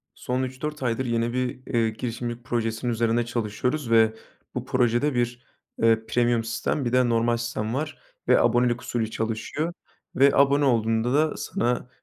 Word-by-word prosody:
Son 125 +1 -2
3-4 135 +3 -5
aydır 125 +1 0
yeni 120 0 0
bir, 125 0 -2
eee, 115 -1 +3
girişimcilik 120 +1 -5
projesinin 115 -1 -1
üzerinde 115 +1 +1
çalışıyoruz 120 +3 -2
ve 110 -1 +5 0.4
bu 125 0 -3
projede 125 +2 +1
bir, 120 0 -1 0.4
eee, 115 -1 +3
premium 120 0 +1
sistem 115 +5 -2
bir 120 - 0
de 125 -1 +4
normal 115 0 +2
sistem 115 -1 -3
var 150 +4 -3 0.3
ve - - +5
abonelik 120 0 +2
usulü 115 -2 -2
çalışıyor 115 +10 -3 0.4
ve 140 +1 +6
abone 140 +1 +4
olduğunda 115 -1 +1
da 155 +2 +2
sana, 125 +1 -2
120 Hz, 155 wpm, -25 LUFS, 115-130 Hz, 0.4 s, ve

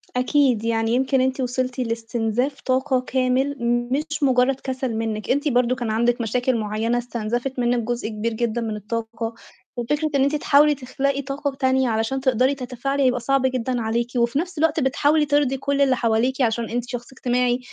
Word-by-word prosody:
أكيد، 250 -3 +2
يعني 225 0 0
يمكن 265 +1 +2
أنتِ 260 +1 0
وصلتِ 255 0 -2
لاستنزاف 230 +3 -2
طاقة 260 0 +1
كامل، 260 +2 0 0.4
مش 310 +3 -2
مُجرّد 260 0 +3
كَسَل 260 -3 -3
منِّك. 220 -1 -3
أنتِ 285 +3 +1
برضه 250 -2 +2
كان 240 -3 -3
عندِك 235 +2 +1
مشاكل 245 +2 0
معيّنة 220 +2 -1
استنزفِت 240 +2 -3
منِّك 240 0 +2
جزء 240 -2 -2
كبير 220 +1 -3
جدًا 235 +1 -1
من 220 -2 -3
الطاقة، 225 +2 -4 0.4
وفكرة 295 +6 -1
إن 270 - +4
أنتِ 280 +2 +1
تحاولي 295 0 +4
تخلقي 275 +1 -2
طاقة 280 +1 -3
تانية 260 -1 +2
علشان 225 +4 -1
تقدري 260 +1 +2
تتفاعلي 275 +2 -2
هيبقى 250 -1 +2
صعب 270 +2 +1
جدًا 255 -1 -1
عليكِ، 230 +2 -1
وفي 235 +4 +2
نَفْس 350 +1 -4
الوقت 315 +1 +2
بتحاولي 290 +3 +2
ترضي 285 -2 +1
كل 280 +1 -1
اللي 265 -2 +4
حواليكِ 240 +3 +1
عشان 230 -1 0
أنتِ 245 +1 -3
شخص 245 0 -6
اجتماعي، 250 -1 0
255 Hz, 175 wpm, -22 LUFS, 235-270 Hz, 0.4 s, إن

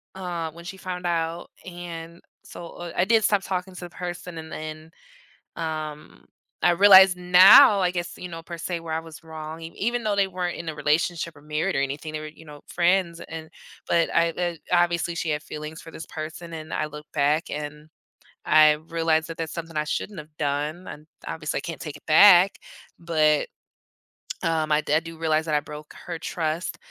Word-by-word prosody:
uh, 175 -3 -4
when 170 +2 -13
she 190 +2 -7
found 180 -1 -6
out, 165 0 -2 0.2
and 170 -2 -8 0.2
so, 175 - -10
uh 175 -1 -7
I 175 - +2
did 220 +1 +3
stop 205 -1 +2
talking 185 0 -4
to - - -8
the 175 - -7
person 175 -1 -6
and 160 0 -10
then, 155 0 -7 0.7
um, 155 - -6 0.4
I 175 - +5
realize 190 +1 +8
now, 180 +3 +8
I 180 -1 +2
guess, 175 -1 -4
you 180 - -7
know, 165 -1 -7
per 170 +1 -8
se 170 +1 -3
where 165 -1 -4
I 160 - -1
was 165 -1 -12
wrong 160 0 -8
e 165 - -6
even 240 +3 -1
though 210 -2 0
they 200 -1 +3
weren't 180 -1 -3
in 170 - -7
a - - -8
relationship 155 +2 0
or 145 - -16
married 155 +4 -1
or 135 - +2
anything, 145 +3 -4
they 155 - -3
were, 155 - -6
you 160 +1 -16
know, 145 -1 -12
friends 175 -1 +1
and 160 -1 -8 0.4
but 170 -1 +3
I, 170 0 +3
uh 175 +1 -2 0.2
obviously 175 -1 +2
she 170 0 -3
had 150 0 -1
feelings 155 +1 -8
for 165 - -11
this 160 - -9
person 165 +2 -7
and 155 -1 -8
I 155 - -1
look 150 0 -10
back 150 +2 +1
and 150 +1 -6 0.6
I 155 -1 +6
realize 165 -1 +1
that 165 - -6
that's 165 -1 -4
something 165 -1 -7
I 150 - +1
shouldn't 195 +4 -4
have 150 0 -13
done 150 +4 -2
and 150 - -9 0.2
obviously 155 -2 -3
I - - -7
can't 165 -3 -6
take 150 -2 -6
it - - -25
back, 185 +3 +7 0.4
but. 155 -3 +2 1.0
Um, 160 -2 0
I 150 - +4
di - - -3
I - - +3
do 165 0 -10
realize 160 -1 +1
that 155 - 0
I 150 - +3
broke 150 +1 -10
her 165 - -5
trust, 160 +1 -3
165 Hz, 205 wpm, -25 LUFS, 155-175 Hz, 1.0 s, realize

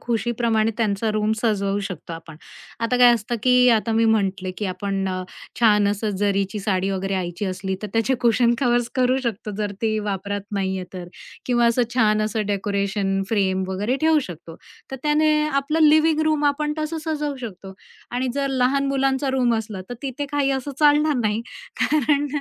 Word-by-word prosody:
खुशीप्रमाणे 230 -1 0
त्यांचा 220 -1 0
रूम 215 0 +1
सजवू 200 -3 0
शकतो 170 -2 -8
आपण. 165 -1 -9 0.4
आता 230 +2 +1
काय 245 -1 +8
असतं, 235 +1 -3
की 250 0 +5
आता 225 0 +2
मी 225 +1 +3
म्हटले 195 -4 +1
की 210 - -3
आपण 195 +1 -2
अ, 185 0 -3 0.4
छान 210 -3 +4
असं 205 +1 -1
जरीची 200 0 0
साडी 195 -1 0
वगैरे 195 0 -2
आईची 180 +1 -3
असली, 190 +1 -3
तर 210 - -2
त्याचे 225 +4 +1
कुशन 235 0 +3
कव्हर्स 240 -2 +1
करू 255 0 +2
शकतो 215 -2 -3
जर 205 -1 -2
ती 215 -1 +1
वापरात 200 +1 -3 0.2
नाहीये 190 -1 -2
तर. 180 -1 -6 0.4
किंवा 240 -1 +3
असं 235 +2 +3
छान 215 -3 +3
असं 215 -1 -2
डेकोरेशन 200 -1 -1
फ्रेम 190 -3 +1
वगैरे 205 +7 -1
ठेवू 315 0 +4
शकतो. 165 -1 -10 0.3
तर 265 - -4
त्याने 305 +1 +3 0.2
आपलं 305 +3 +2
लिव्हिंग 310 +1 +4
रूम 300 -1 0
आपण 300 +1 +1
तसं 310 +1 -3
सजवू 295 -2 -2
शकतो. 195 -4 -8 0.4
आणि 250 +1 -1
जर 280 -1 -1
लहान 270 +1 +1
मुलांचा 270 0 0
रूम 250 -3 +2
असला, 210 -3 -6
तर - - -3
तिथे 275 +1 -4
काही 285 -1 +1
असं 270 +1 -2
चालणार 300 0 +4
नाही, 215 +1 0 0.4
कारण 290 -1 +2
225 Hz, 175 wpm, -22 LUFS, 200-265 Hz, 0.4 s, काय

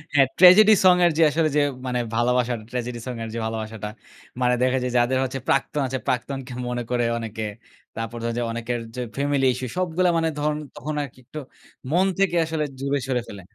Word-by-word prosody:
হ্যাঁ, 135 -2 +6
tragedy 200 +4 +9
song 180 -1 +8
এর 170 - +4
যে, 165 - +5
আসলে 160 0 +1
যে, - - +5 0.3
মানে 125 -1 -1 0.2
ভালোবাসা, 125 +1 +2 0.2
ট্র্যাজেডি 120 -1 -4 0.2
এর 110 - -5
যে, - - -2
ভালোবাসাটা 110 -1 -4 0.5
মানে 125 0 +3
দেখা 130 +1 +2
যায় 125 - -2
যাদের 120 +2 +2
হচ্ছে 130 +1 -3
প্রাক্তন 140 +1 +1
আছে, 130 0 -3
প্রাক্তনকে 130 +1 -2
মনে 125 0 -2
করে 120 -1 +1
অনেকে। 110 -1 -5 0.5
তারপর 115 +1 -5
ধরেন 115 0 -2
যে, 120 - 0
অনেকের 120 +1 -3 0.2
যে, 125 - -3 0.2
ফ্যামিলি 140 -1 +1
ইস্যু 130 - -5
সবগুলা 180 0 +1
মানে 165 0 +1
ধরুন 150 0 0 0.2
তখন 150 +4 -5
আরকি 130 -2 -10
একটু 155 - -8 0.5
মন 180 +4 +3
থেকে 195 -3 +2
আসলে 160 -1 -2 0.2
দূরে 140 +1 0
সরে 125 -2 0
ফেলে। 100 -2 -9
130 Hz, 190 wpm, -23 LUFS, 120-150 Hz, 0.5 s, ট্র্যাজেডি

